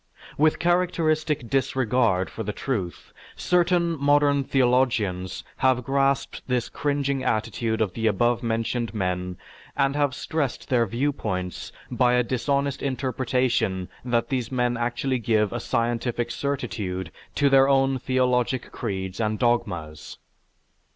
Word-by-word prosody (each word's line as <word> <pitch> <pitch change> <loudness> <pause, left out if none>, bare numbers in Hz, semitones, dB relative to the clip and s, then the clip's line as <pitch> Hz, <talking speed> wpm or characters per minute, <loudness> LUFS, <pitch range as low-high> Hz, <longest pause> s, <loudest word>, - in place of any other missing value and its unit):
With 155 +1 +3
characteristic 165 -5 +1
disregard 125 -6 +1
for - - -6
the 105 -1 -2
truth 100 -7 -4 0.2
certain 175 -3 +1
modern 145 -1 +4
theologians 120 -9 +1
have 130 -1 +2
grasped 135 +2 0
this 125 -2 0
cringing 140 -2 -1
attitude 110 -1 -1
of 100 -5 0
the 115 -1 0
above 120 +3 +2
mentioned 115 0 -2
men 90 -2 -2 0.4
and 140 0 +2
have 145 -2 +1
stressed 145 -3 -3
their 120 -3 +3
viewpoints 105 -7 -2 0.2
by 125 0 +3
a 125 - +3
dishonest 140 +3 -1
interpretation 125 -7 0
that 120 -2 0
these 125 -4 -2
men 125 -1 +1
actually 120 +2 -1
give 110 -3 +1
a 120 - -2
scientific 120 0 -1
certitude 105 - -3 0.2
to 145 - +3
their 135 0 +5
own 135 -1 +3
theologic 125 -1 0
creeds 95 -1 -4
and 110 -1 0
dogmas. 90 - -1
125 Hz, 125 wpm, -25 LUFS, 110-135 Hz, 0.4 s, their